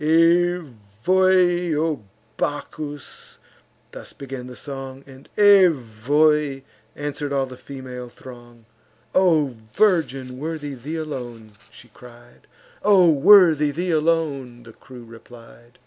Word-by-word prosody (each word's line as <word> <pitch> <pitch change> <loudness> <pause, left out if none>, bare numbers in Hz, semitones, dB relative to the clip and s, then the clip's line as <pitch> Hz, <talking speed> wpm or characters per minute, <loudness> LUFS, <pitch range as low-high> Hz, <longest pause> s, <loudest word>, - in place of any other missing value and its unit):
"Evoe! 175 - +1
O 155 -7 -2 0.3
Bacchus!" 145 0 -6 0.5
thus - - -11
began 135 -2 -8
the 125 - -10
song; 135 -1 -8
And 135 0 -16
"Evoe!" 150 - +3 0.3
answer'd 145 0 -5
all 135 -1 0
the 130 -1 -11
female 125 -2 -9
throng. 120 -2 -15 0.5
"O 160 -8 +2 0.2
virgin! 135 -11 0
worthy 150 -1 -5
thee 140 +5 -7
alone!" 120 -8 -7 0.2
she 120 +2 -17
cried; 120 +1 -17 0.3
"O 185 -5 +5
worthy 160 -1 +5
thee 175 +5 -3
alone!" 150 -7 -1
the 115 -1 -14
crew 125 0 -14
replied. 120 +1 -16
140 Hz, 105 wpm, -22 LUFS, 125-165 Hz, 0.5 s, O